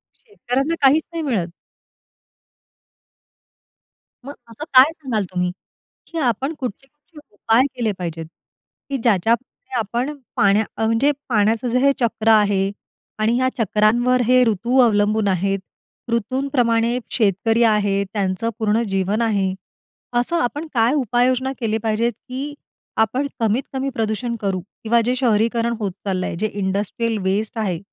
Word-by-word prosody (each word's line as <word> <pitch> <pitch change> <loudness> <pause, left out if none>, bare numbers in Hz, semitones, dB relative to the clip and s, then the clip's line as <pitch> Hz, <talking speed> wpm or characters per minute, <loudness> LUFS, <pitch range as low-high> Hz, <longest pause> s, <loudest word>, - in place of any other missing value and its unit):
शेतकऱ्यांना 310 - -2
काहीच 285 +3 +5
नाही 330 -1 -3
मिळत. 220 - 0 2.8
मग 285 - -6 0.2
असं 230 +6 -8
काय 260 +4 +8
सांगाल 260 -10 -3
तुम्ही, 180 0 -1 0.6
की 335 - -7
आपण 265 +1 0
कुठचे, 260 +1 -5
कुठचे 295 +2 -18
उपाय 225 +4 +3
केले 235 -4 0
पाहिजेत, 165 -2 -5 0.6
की 275 - -1
ज्याच्याप्रमाणे 230 +1 +2 0.3
आपण 240 +7 -2 0.2
पाण्या 200 +2 +4 0.2
म्हणजे 230 +6 +3 0.2
पाण्याचं 220 +1 +2
जे 250 +2 +2
हे 280 +2 +4
चक्र 225 -2 -1
आहे 200 -2 +3 0.5
आणि 220 +2 +2
ह्या 255 0 +2
चक्रांवर 235 +3 +2
हे 250 +1 +5
ऋतू 235 +4 0
अवलंबून 215 -2 +2
आहेत, 195 +1 0 0.5
ऋतूंप्रमाणे 235 0 +1
शेतकरी 225 +2 +2
आहेत, 205 -3 +2
त्यांचं 200 +2 -1
पूर्ण 220 +1 +2
जीवन 195 +3 0
आहे. 200 -4 +1 0.7
असं 245 +8 -1
आपण 295 +6 -2
काय 235 +3 +3
उपाययोजना 255 0 +1
केली 220 -3 0
पाहिजे, 225 +1 +1
की 270 +5 -7 0.5
आपण 255 +6 +1
कमीत 225 +3 +1
कमी 270 +1 -1
प्रदूषण 225 +2 -2
करू? 195 -2 -1 0.2
किंवा 230 +1 +3
जे 250 - +1
शहरीकरण 235 -1 +1
होत 205 -3 -2
चालल 185 -2 -1
आहे, - - -3
जे 210 +6 -1
इंडस्ट्रियल 205 +3 -1
वेस्ट 205 +4 -1
आहे. 185 -6 -1
230 Hz, 135 wpm, -21 LUFS, 205-255 Hz, 2.8 s, काय